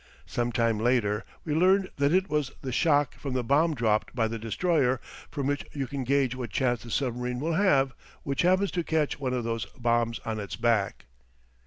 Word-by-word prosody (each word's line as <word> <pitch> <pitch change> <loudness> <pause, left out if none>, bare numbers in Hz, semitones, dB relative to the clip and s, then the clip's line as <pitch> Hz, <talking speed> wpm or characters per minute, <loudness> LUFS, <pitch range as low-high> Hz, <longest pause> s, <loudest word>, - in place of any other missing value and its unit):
Some 120 0 -2
time 115 -2 +1
later 110 -3 +1 0.2
we 155 - -1
learned 185 +4 +3
that 140 0 +2
it 190 +2 +3
was 150 -6 0
the 130 - -3
shock 145 +1 +2
from 135 -3 -6
the 125 - 0
bomb 150 +6 +3
dropped 110 -3 0
by 115 -3 +2
the 115 0 -4
destroyer, 130 - +1 0.3
from 140 -3 -3
which 145 0 0
you 140 -2 -2
can 135 +1 -4
gauge 135 -1 +2
what 125 -3 -5
chance 120 +4 0
the 120 - -10
submarine 125 0 -2
will 160 +4 -1
have 140 -8 +3 0.3
which 140 -1 -1
happens 185 +2 +3
to 175 - -1
catch 155 -3 0
one 130 -2 -1
of 125 - -2
those 115 0 -2
bombs 120 -1 +1
on 110 -1 -2
its 100 -4 -5
back. 110 -2 0
130 Hz, 200 wpm, -27 LUFS, 115-150 Hz, 0.3 s, learned